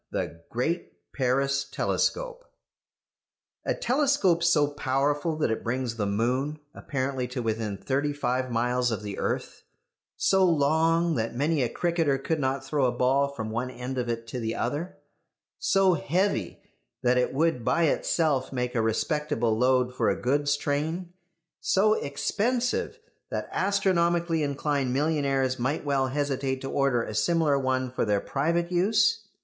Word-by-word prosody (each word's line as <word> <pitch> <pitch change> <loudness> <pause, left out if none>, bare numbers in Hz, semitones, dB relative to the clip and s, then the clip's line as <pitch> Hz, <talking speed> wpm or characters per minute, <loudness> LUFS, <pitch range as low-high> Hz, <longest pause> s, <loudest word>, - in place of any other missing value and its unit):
THE 85 - -4
GREAT 155 +9 -2 0.2
PARIS 135 +1 +1
TELESCOPE - - -1 1.2
A - - +1
telescope 255 - +2
so 170 -4 +4
powerful 145 +2 0
that 150 - +1
it 110 - -2
brings 120 0 -2
the 105 -3 -1
moon 125 +8 0 0.2
apparently 130 -2 -3
to 125 -1 -4
within 110 -2 -2
thirty 140 +7 -1
five 130 -2 -1
miles 125 +1 +1
of 110 -2 -3
the 100 -1 -5
earth; - - -3 0.6
so 190 -1 +3
long 165 +1 +3
that 115 +1 -2
many 145 +3 +1
a 120 - +1
cricketer 165 -5 +1
could 155 +4 -2
not 135 0 -1
throw 140 0 +1
a 125 - +2
ball 130 +3 +2
from 110 -6 -5
one 120 +3 -2
end 130 +1 -5
of 120 -1 -2
it 115 0 -3
to 125 - -4
the 115 -1 -2
other; 145 +9 -3 0.6
so 195 -1 +3
heavy 170 - -1 0.4
that 125 +1 +3
it 125 - +1
would 155 -3 +1
by 170 - +2
itself 150 -3 +1
make 125 -2 -2
a 115 - +1
respectable 120 +1 0
load 125 +1 +2
for - - +1
a - - -1
goods 145 +3 +1
train; 160 +5 -2 0.5
so 205 +1 +3
expensive 230 - -1 0.3
that - - -3
astronomically 170 -4 +1
inclined 140 -2 -1
millionaires 135 -3 +1
might 140 +5 -1
well 135 -2 +1
hesitate 135 -1 -1
to 135 - -5
order 135 -4 +2
a 110 - -6
similar 155 +3 +2
one 130 -1 -1
for 130 - -1
their 105 -2 +2
private 170 - -1
use. 205 +4 +2
140 Hz, 150 wpm, -27 LUFS, 125-165 Hz, 1.2 s, so